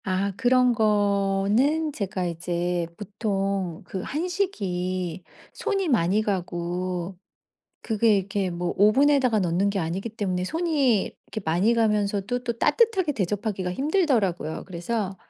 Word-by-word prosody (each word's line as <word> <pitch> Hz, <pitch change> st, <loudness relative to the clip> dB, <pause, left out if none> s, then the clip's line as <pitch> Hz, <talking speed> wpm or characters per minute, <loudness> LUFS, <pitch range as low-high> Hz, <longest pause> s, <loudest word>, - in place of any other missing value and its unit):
아 190 Hz, 0 st, 0 dB
그런 250 Hz, +1 st, +3 dB
거는 210 Hz, +7 st, +2 dB
제가 190 Hz, -6 st, -3 dB
이제 175 Hz, 0 st, -2 dB
보통 195 Hz, -4 st, -2 dB
그 190 Hz, +1 st, -5 dB
한식이 185 Hz, -, -2 dB, 0.3 s
손이 390 Hz, -4 st, -1 dB
많이 210 Hz, -, +2 dB
가고 180 Hz, -1 st, -3 dB, 0.7 s
그게 220 Hz, -1 st, +2 dB
이렇게 195 Hz, 0 st, -1 dB
뭐 175 Hz, 0 st, -3 dB
오븐에다가 255 Hz, +3 st, +4 dB
넣는 185 Hz, +1 st, +1 dB
게 200 Hz, -, -2 dB
아니기 180 Hz, +5 st, -2 dB
때문에 195 Hz, -5 st, -2 dB
손이 280 Hz, -, +1 dB
이렇게 220 Hz, -, -8 dB
많이 180 Hz, +9 st, +2 dB
가면서도 210 Hz, +1 st, 0 dB
또 235 Hz, -2 st, -3 dB
따뜻하게 375 Hz, -, +2 dB
대접하기가 195 Hz, -3 st, -2 dB
힘들더라고요. 245 Hz, -, 0 dB
그래서 190 Hz, +2 st, -3 dB
200 Hz, 280 characters per minute, -25 LUFS, 180-240 Hz, 0.7 s, 오븐에다가